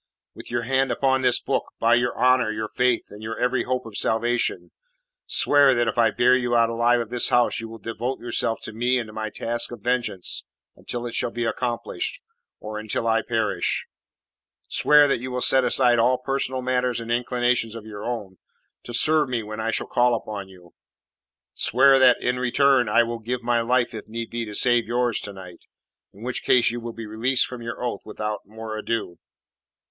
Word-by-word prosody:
"With - - -11
your 120 0 -2
hand 135 +2 +1
upon 130 -1 +1
this 125 -1 +3
book, - - -1 0.2
by 115 +1 +3
your 120 0 +1
honour, 130 -2 +3
your 110 0 -4
faith, 125 -2 +1
and 105 +1 -11
your 110 +1 -5
every 125 0 0
hope 125 -1 -2
of 110 -2 -10
salvation, 120 +2 -1 0.6
swear 140 -2 +4
that 120 0 +1
if 115 - -1
I 115 -1 +5
bear 125 +3 +3
you 120 -1 0
alive 115 +1 +3
out - - 0
of 110 - -15
this 125 -1 +2
house 120 -1 +2
you 115 0 -7
will 115 - -9
devote 115 +4 -4
yourself 115 -1 -1
to 110 - -6
me 120 +3 +1
and 120 - -2
to - - -12
my 110 0 -4
task 115 +3 -2
of 120 -3 -9
vengeance 115 -6 -1 0.3
until 120 0 -5
it 120 - -5
shall - - 0
be 120 0 -3
accomplished 125 - -2 0.4
or 110 0 -6
until 110 +1 -2
I 115 0 +2
perish; 110 -3 -1 0.8
swear 150 -1 +5
that 135 - 0
you 130 +2 -6
will 125 0 -3
set 130 +1 +4
aside 120 -1 +3
all 125 +2 +3
personal 130 0 -2
matters 125 -1 0
and 115 0 -6
inclinations 120 -1 0
of 115 -2 -9
your 105 -1 -8
own, 105 -6 -5 0.5
to 120 - -3
serve 150 +2 +3
me 120 -3 -2
when 110 +1 -7
I 110 +1 -1
shall - - -1
call 120 0 +2
upon 105 -3 -6
you. 90 -2 -17 0.8
Swear 135 +3 +4
that, 130 -2 +6
and, - - -3
in 125 0 0
return, 125 -1 +3
I 120 +3 +4
will 115 0 -4
give 120 +2 -4
my 120 0 +1
life 120 +1 +1
if 110 - -8
need 115 +1 -6
be 115 0 -3
to 105 -1 -8
save 120 -1 +3
yours 120 -1 0
to 105 - -6
night, 90 -2 -11 0.5
in 105 - -14
which 125 +1 -2
case 120 -2 +3
you 120 - -4
will 120 0 -6
be 115 0 -8
released 115 +5 +1
from 125 -2 -8
your 115 +1 -6
oath 120 - -3
without 105 0 -4
more 110 +1 -7
ado." 110 -5 -3
120 Hz, 205 wpm, -23 LUFS, 110-125 Hz, 0.8 s, that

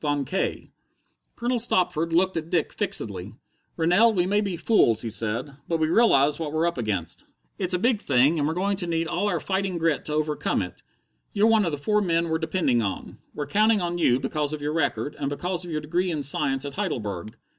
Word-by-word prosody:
Von 145 -2 0
K.'" 185 +9 -3 0.6
Colonel 240 +1 -1
Stopford 175 -7 +1
looked 185 +3 +2
at 165 0 -3
Dick 170 -3 0
fixedly. 110 - -2 0.4
"Rennell, 180 +8 +4
we 175 -1 +2
may 205 +3 +2
be 195 -4 -3
fools," 120 - +3
he 115 - -3
said, 115 +6 -3
"but 165 - 0
we 155 -1 +1
realize 150 - +4
what 155 -3 -3
we're 160 +2 +1
up 170 -6 -1
against. 100 -7 -3 0.3
It's 185 -1 +1
a - - +2
big 225 +2 +1
thing, 140 +4 +3
and 145 - +1
we're 160 - -2
going 195 +2 0
to 180 -3 -4
need 165 -1 -1
all 205 - -1
our - - 0
fighting 190 -2 -2
grit 165 -3 0
to 150 - -3
overcome 150 -8 0
it. 90 - -9 0.5
You're 205 +1 +3
one 220 -2 +4
of 165 - -1
the 145 - -3
four 210 +9 +1
men 170 -3 +1
we're 160 0 0
depending 160 -7 +1
on. 100 -3 -5 0.2
We're 145 - -3
counting 215 +8 +3
on 175 -1 -2
you 125 -6 +3
because 145 +2 -2
of 155 - -4
your 150 +1 -1
record, 150 -1 -1
and 140 - -1
because 175 +5 -3
of 175 - -8
your 155 -2 -2
degree 175 +5 -1
in 155 -4 -2
science 135 -1 -1
at 140 - -5
Heidelberg. 110 - -4
160 Hz, 220 wpm, -25 LUFS, 140-185 Hz, 0.6 s, Rennell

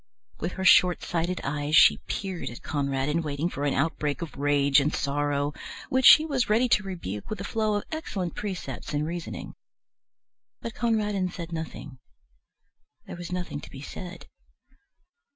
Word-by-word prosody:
With 170 +3 -3
her 190 - -4
short 180 -1 +6
sighted 175 +1 -1
eyes 145 +2 -1
she 155 - +7
peered 190 -3 -3
at 120 - -10
Conradin, 140 +1 -1
waiting 150 +2 -2
for 145 -4 -3
an 140 - +1
outbreak 150 +1 -1
of 165 - -8
rage 140 0 +3
and 145 +2 +1
sorrow, 145 0 -1 0.4
which 260 0 +4
she 310 - +9
was 270 -8 0
ready 230 +4 +4
to 210 - +4
rebuke 170 - -6
with 215 - -4
a - - -4
flow 215 0 0
of 205 - -1
excellent 200 - -3
precepts 190 -6 -5
and 150 +1 0
reasoning. 160 - -5 1.1
But 230 - -6
Conradin 210 -5 0
said 170 -1 -7
nothing: 155 -5 -6 1.1
there - - -7
was 175 0 -7
nothing 180 -5 -4
to - - -11
be 135 - -10
said. 180 +4 -8
170 Hz, 160 wpm, -27 LUFS, 145-195 Hz, 1.1 s, she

